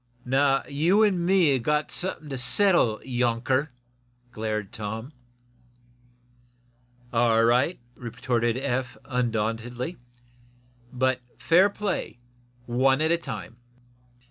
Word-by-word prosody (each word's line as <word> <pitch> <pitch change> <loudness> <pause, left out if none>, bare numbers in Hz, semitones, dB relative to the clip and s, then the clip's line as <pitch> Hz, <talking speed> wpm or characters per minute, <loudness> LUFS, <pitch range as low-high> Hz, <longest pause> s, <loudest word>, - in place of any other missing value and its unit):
"Now, 135 +2 +2
you 165 +9 +3
an' 190 -5 +2
me 180 -3 +4
have 130 - 0
got 150 +4 0
something 175 -4 -2
to 135 - -4
settle, 130 - +3
younker," 125 +3 0 0.6
glared 110 -3 -4
Tom. 110 +6 -6 2.0
"All 115 -1 +3
right," 125 +9 +2
retorted 120 -1 -2
Eph, 130 -2 -2
undauntedly. 120 +2 -2 0.9
"But 130 0 0 0.2
fair 180 +5 +4
play 200 - -3 0.5
one 130 +3 +2
at 160 +1 +2
a 170 - +3
time." 120 - -7
130 Hz, 100 wpm, -26 LUFS, 120-155 Hz, 2.0 s, me